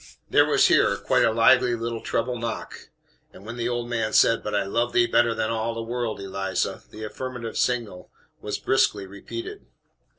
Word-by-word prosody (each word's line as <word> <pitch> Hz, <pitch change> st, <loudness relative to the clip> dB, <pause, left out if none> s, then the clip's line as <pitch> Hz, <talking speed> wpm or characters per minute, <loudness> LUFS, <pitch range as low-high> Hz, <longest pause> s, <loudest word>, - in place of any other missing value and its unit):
There -, -, +5 dB
was -, -, +4 dB
here -, -, +4 dB
quite -, -, +2 dB
a -, -, +3 dB
lively 120 Hz, +2 st, +4 dB
little 115 Hz, 0 st, -4 dB
treble 125 Hz, +1 st, -2 dB
knock; 115 Hz, -1 st, -6 dB, 0.4 s
and 100 Hz, -, -15 dB
when 115 Hz, +2 st, -7 dB
the 120 Hz, 0 st, -2 dB
old 120 Hz, -1 st, -2 dB
man 115 Hz, -2 st, -2 dB
said, 115 Hz, -, +4 dB
"But 105 Hz, -, -3 dB
I 100 Hz, -, +2 dB
loved 115 Hz, +4 st, -1 dB
thee 120 Hz, -, +5 dB
better 120 Hz, 0 st, +2 dB
than 110 Hz, 0 st, -1 dB
all 115 Hz, 0 st, -2 dB
the 115 Hz, -, -4 dB
world, 120 Hz, -1 st, -3 dB
Eliza," 95 Hz, -1 st, -3 dB
the 110 Hz, +1 st, -10 dB
affirmative 120 Hz, +1 st, -6 dB
signal 115 Hz, -7 st, -2 dB, 0.3 s
was -, -, -3 dB
briskly 105 Hz, -6 st, +1 dB
repeated. 100 Hz, +4 st, -8 dB
115 Hz, 185 wpm, -24 LUFS, 110-120 Hz, 0.4 s, There